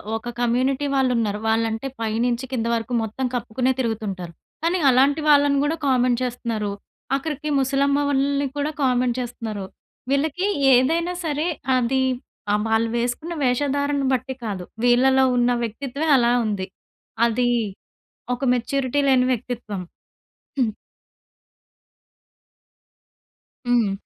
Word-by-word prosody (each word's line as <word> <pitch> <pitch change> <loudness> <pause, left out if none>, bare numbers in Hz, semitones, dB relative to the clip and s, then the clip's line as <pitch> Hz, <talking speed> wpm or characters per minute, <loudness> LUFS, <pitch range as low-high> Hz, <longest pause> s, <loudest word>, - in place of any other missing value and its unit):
ఒక 230 +2 -5
కమ్యూనిటీ 255 +4 +1
వాళ్ళున్నారు. 235 -6 +1
వాళ్ళంటే 225 +3 0
పై 220 -1 -1
నుంచి 245 +1 -1
కింద 230 -3 -1
వరకు 230 +2 -4
మొత్తం 225 +4 -3
కప్పుకునే 245 +2 0
తిరుగుతుంటారు. 205 -7 -3 0.3
కానీ 345 +2 +1
అలాంటి 275 +4 +4
వాళ్ళని 285 -1 +5
గూడా 310 +3 0
కామెంట్ 250 -2 +3
చేస్తున్నారు. 230 -4 -3 0.4
ఆఖరికి 300 +1 -3
ముసలమ్మ 280 +1 +2
వాళ్ళని 280 0 +1
కూడా 290 +2 -1
కామెంట్ 250 -1 +2
చేస్తున్నారు. 225 -5 -5 0.4
వీళ్ళకి 310 +7 0 0.3
ఏదైనా 330 +8 +2
సరే 305 +2 -1 0.3
అది 255 +2 +1 0.5
ఆహ్, 210 0 +2
వాళ్ళు 225 +1 +2
వేసుకున్న 245 +8 -2
వేషధారణను 285 +2 +1
బట్టి 260 +1 -1
కాదు. 195 -4 -3 0.2
వీళ్ళలో 265 +2 +4
ఉన్న 245 0 +3
వ్యక్తిత్వమే 275 +7 -3
అలా 240 -1 +3
ఉంది. 200 -3 -2 0.6
అది 245 +1 +1 0.9
ఒక 275 - -9
మెచ్యూరిటీ 260 +3 -1
లేని 255 -2 +4
వ్యక్తిత్వం. 225 -5 -4 0.8
హుహు. 225 -5 +1 3.0
హ్మ్. 235 -5 +3
250 Hz, 110 wpm, -23 LUFS, 230-280 Hz, 3.0 s, వాళ్ళని